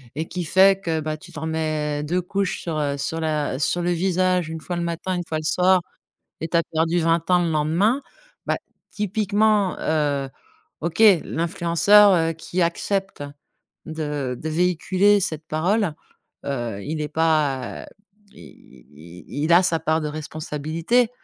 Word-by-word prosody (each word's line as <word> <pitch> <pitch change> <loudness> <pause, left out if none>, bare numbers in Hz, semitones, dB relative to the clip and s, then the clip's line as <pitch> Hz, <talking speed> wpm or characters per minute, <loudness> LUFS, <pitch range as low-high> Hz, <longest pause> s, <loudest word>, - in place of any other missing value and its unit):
et 160 +2 -4
qui 180 -2 -4
fait 190 +3 +5
que 165 -4 -2
bah, 155 0 -3
tu - - -15
t'en 160 +1 -5
mets 155 -2 -2
2 180 +4 -1
couches 195 +2 -2
sur, 165 -3 -3
heu, 140 -1 -1
sur 160 +3 -3
la 150 -4 -1
sur 175 +4 0
le 175 - 0
visage, 180 0 +1
1 160 0 -6
fois 175 +2 -4
le 170 - -2
matin, 170 +2 -3
1 175 -1 -3
fois 155 -1 -2
le - - -8
soir 180 +3 +3 0.6
et 160 - -3
tu 165 - -4
as 170 - +4
perdu 165 +2 0
20 165 +1 +1
ans 180 -1 +4
le 170 - 0
lendemain. 170 - +1 0.4
Bah, - - +1 0.4
typiquement, 210 -1 +1
heu, 145 -3 0 0.5
OK, 170 +7 0 0.2
l'influenceur, 180 +4 +4
heu, 165 -1 +2
qui 175 +3 -4
accepte 195 +2 -1 0.6
de 150 -5 -4
de 160 - -4
véhiculer 180 +4 +2
cette 160 -5 -3
parole, 180 +3 0 0.5
heu, 120 -7 -3
il 155 +1 -3
est 150 - -3
pas, 155 -6 0
heu, - - -11 0.5
il 65 -6 -16
il 85 +4 -14
il-il 155 +4 0
a 175 +2 +6
sa 165 -2 +1
part 160 0 0
de 150 - -2
responsabilité. 155 +9 -1
165 Hz, 165 wpm, -23 LUFS, 155-180 Hz, 0.6 s, a